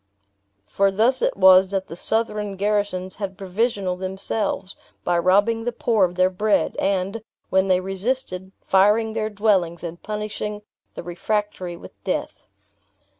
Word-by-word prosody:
For 195 - +2
thus 225 +7 +2
it - - 0
was 190 0 +7
that 195 -1 -2
the 165 - -8
Southron 210 0 -1
garrisons 200 -2 -1
had 195 -2 -5
provisional 195 -1 -1
themselves; 190 +1 -3 0.3
by 175 -1 +1
robbing 205 +6 +3
the 245 - -1
poor 225 -4 +2
of 175 0 -5
their 185 +1 +3
bread; 205 +3 +1
and, 195 +3 0 0.3
when 190 0 +3
they 185 -1 +3
resisted, 190 -1 -3
firing 210 +3 +3
their 220 -1 -1
dwellings, 195 -6 +1
and 170 0 -6
punishing 210 0 -4 0.3
the - - -6
refractory 180 0 -3
with - - -14
death. - - -3
195 Hz, 140 wpm, -23 LUFS, 185-210 Hz, 0.3 s, was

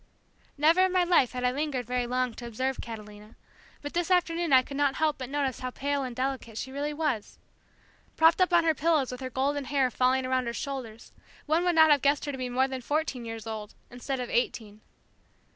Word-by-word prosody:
Never 320 +5 +4
in 375 - -1
my 365 -1 +3
life 345 -9 +3
had 250 0 -4
I 250 - +3
lingered 275 -2 -2
very 245 0 -1
long 250 -1 -1
to 240 +1 -8
observe 260 +3 -2
Catalina, 210 -1 -10 0.5
but 290 - -6
this 345 0 -1
afternoon 345 -3 +1
I 260 -1 +7
could 280 - -9
not 280 -1 +1
help 310 -2 0
but 255 -1 -5
notice 275 -3 -1
how 255 - -3
pale 280 +2 -2
and 255 -3 -5
delicate 255 -3 -3
she 260 - -5
really 285 +2 -3
was. 295 -8 -2 0.8
Propped 325 +3 +5
up 365 - +3
on 345 -1 +5
her 325 -1 +3
pillows 310 -3 +1
with 250 - -7
her 260 - -4
golden 275 +2 -1
hair 270 -2 +1
falling 255 +1 +2
around 255 -1 0
her 235 - -2
shoulders, 250 -5 -6 0.3
one 315 +3 +2
would 355 -1 +2
not 315 -1 +7
have 290 -2 +4
guessed 285 +1 +2
her 290 - -2
to 270 - -6
be 250 -1 -3
more 260 +2 +2
than 260 -1 -5
fourteen 285 -3 -2
years 225 -1 -7
old, 220 -2 -6 0.2
instead 255 +2 -4
of 245 - -4
eighteen. 215 -3 -2
265 Hz, 220 wpm, -28 LUFS, 245-295 Hz, 0.8 s, I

